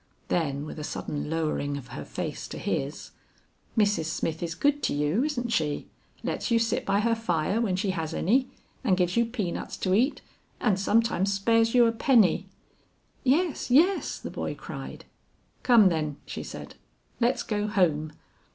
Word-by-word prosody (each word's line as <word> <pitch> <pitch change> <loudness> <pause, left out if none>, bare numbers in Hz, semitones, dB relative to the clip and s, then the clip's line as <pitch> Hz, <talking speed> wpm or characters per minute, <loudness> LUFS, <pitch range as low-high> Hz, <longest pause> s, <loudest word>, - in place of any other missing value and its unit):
Then 145 -4 0
with 155 - -7
a - - -5
sudden 145 0 -4
lowering 155 -3 -1
of 135 - -10
her - - -6
face - - -5
to - - -7
his - - -3 0.7
"Mrs. 205 -6 +3
Smith 165 0 -2
is 165 -1 -3
good 290 +5 +2
to - - 0
you, 150 - +1
isn't 245 -5 -2
she; 150 -9 -1 0.3
lets - - -2
you 235 - +4
sit 230 -1 0
by 200 +1 +3
her 230 +1 +2
fire 205 -1 0
when 200 -6 +1
she 190 +1 0
has 165 -4 -3
any, 255 +8 +2 0.3
and 190 -8 +3
gives 180 -1 +1
you 235 0 +4
peanuts 215 -7 -4
to 185 - 0
eat 250 +9 +2 0.4
and 205 -5 +2
sometimes 205 -2 +2
spares 225 +4 +2
you 240 -1 +7
a 230 - +3
penny!" 225 - +3 0.8
"Yes, 300 +4 +1
yes," 335 +10 +3
the - - -7
boy - - -3
cried. - - -8 0.6
"Come 230 -6 +6
then," 155 -4 -2
she - - -6
said, - - -8 0.5
"let's 245 +2 +2
go 210 -1 -1
home." 160 -7 +1
200 Hz, 170 wpm, -27 LUFS, 165-235 Hz, 0.8 s, you